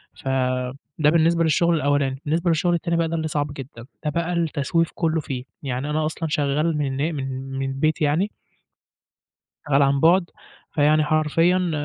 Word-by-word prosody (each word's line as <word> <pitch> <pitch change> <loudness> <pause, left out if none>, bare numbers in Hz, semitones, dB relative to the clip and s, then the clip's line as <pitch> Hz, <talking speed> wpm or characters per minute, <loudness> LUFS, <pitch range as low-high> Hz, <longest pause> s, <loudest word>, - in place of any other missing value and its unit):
فده 130 +3 -1
بالنسبة 165 +1 +3
للشغل 170 +2 +3
الأولاني، 140 -3 0
بالنسبة 165 +4 0
للشغل 170 +2 +2
التاني 170 0 0
بقى 165 -1 +1
ده 165 - -3
اللي 160 -1 -1
صعْب 145 -1 -2
جدًا، 125 -4 -9 0.2
ده 150 - +2
بقى 170 +3 -1
التسويف 165 0 0
كلّه 160 -1 0
فيه، 130 -3 -5 0.2
يعني 135 +1 -3
أنا 155 +1 0
أصلًا 160 +1 -3
شغّال 150 +2 0
من 135 -3 -1 0.2
من 135 0 -5
من 135 0 -1
البيت 155 +4 0
يعني 155 +8 +1 1.4
شغّال 145 -1 +3
عن 140 0 +2
بُعد، 170 +3 +4 0.4
فيعني 155 0 +3
حرفيًا 165 +4 +2
150 Hz, 155 wpm, -23 LUFS, 140-165 Hz, 1.4 s, بُعد